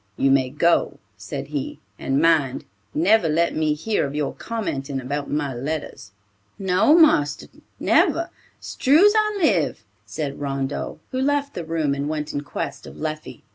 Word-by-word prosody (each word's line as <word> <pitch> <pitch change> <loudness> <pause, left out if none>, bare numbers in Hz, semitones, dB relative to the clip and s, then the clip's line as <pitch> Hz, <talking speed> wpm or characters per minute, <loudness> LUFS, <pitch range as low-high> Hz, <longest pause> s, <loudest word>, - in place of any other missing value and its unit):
"You 135 - +3
may 130 -1 +3
go," 170 +5 +1 0.2
said - - -7
he, - - -4 0.2
"and 135 +1 0
mind, 155 -5 +2 0.3
never 180 +2 +3
let 170 +3 +1
me 155 -1 +1
hear 210 +8 -1
of 140 0 -4
your 150 -1 -1
commenting 140 -12 -4
about 140 +3 -4
my 145 -2 -1
letters." 140 -4 -5 0.5
"No, 195 - +3
marster, 145 - +4 0.3
never; - - +2 0.3
'strue's 330 +11 +4
I 425 -1 +2
live," 160 - +1 0.2
said 140 +7 -5
Rondeau, 135 -1 -3
who 260 - -1
left 285 +1 0
the 175 - -5
room 160 -3 -1
and 140 +1 -3
went 150 -1 -3
in 145 - -2
quest 145 - -6
of 70 - -11
Leffie. 155 0 -6
150 Hz, 155 wpm, -22 LUFS, 140-190 Hz, 0.5 s, marster